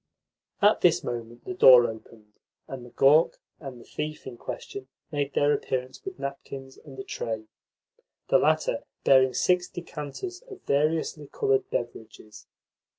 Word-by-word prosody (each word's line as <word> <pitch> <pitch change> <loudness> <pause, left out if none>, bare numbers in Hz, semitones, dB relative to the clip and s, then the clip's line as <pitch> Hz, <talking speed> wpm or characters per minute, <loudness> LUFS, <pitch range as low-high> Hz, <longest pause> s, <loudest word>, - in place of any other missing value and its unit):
At - - +5
this - - +4
moment 120 0 -6
the 185 - -4
door 125 -8 +8
opened, 110 -1 -9 0.3
and 130 -2 -7
the 120 - -12
"gawk" 150 +6 +4 0.2
and 135 -4 -9
the - - -13
"thief" 150 0 -5
in 130 - -7
question 130 +2 -7 0.2
made 145 -2 -2
their 145 +1 +3
appearance 130 0 -3
with 385 -1 -7
napkins 135 -1 -7
and 140 -3 -13
a 130 - -5
tray 110 -3 -4 0.9
the - - +5
latter - - +2 0.2
bearing 130 -2 +5
six 180 +5 +2
decanters 175 - -7
of 395 -2 -11
variously 150 +1 0
coloured 415 - 0
beverages. 110 -2 -6
135 Hz, 145 wpm, -27 LUFS, 120-155 Hz, 0.9 s, door